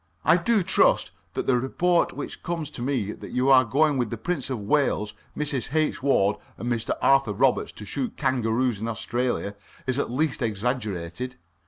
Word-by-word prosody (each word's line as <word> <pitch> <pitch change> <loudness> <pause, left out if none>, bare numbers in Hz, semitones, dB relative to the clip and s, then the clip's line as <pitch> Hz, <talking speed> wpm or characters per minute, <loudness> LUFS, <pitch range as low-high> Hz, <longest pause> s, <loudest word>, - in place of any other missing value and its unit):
I - - +6
do 200 +3 +2
trust - - +3 0.2
that - - -1
the 125 -2 +3
report 175 +7 +2
which - - -7
comes 165 -3 -3
to 125 - -8
me 120 -6 -1
that - - -9
you 125 +2 +2
are 130 -1 +8
going 140 +4 +2
with 120 -3 0
the 115 - -4
Prince 140 +2 -2
of 130 -4 -2
Wales, 105 -2 +1 0.2
Mrs. 145 -2 -2
H. 155 -1 +1
Ward, 105 -7 +3 0.2
and 120 +1 -1
a - - +1
Mr. 115 -1 -2
Arthur 135 -5 +4
Roberts - - +2
to 105 - -9
shoot 130 +3 -3
kangaroos 125 -4 +1
in 115 - -2
Australia 120 -1 -2 0.3
is 130 +1 -1
at - - -1
least 140 +3 0
exaggerated. 110 -1 -2
130 Hz, 185 wpm, -25 LUFS, 115-140 Hz, 0.3 s, are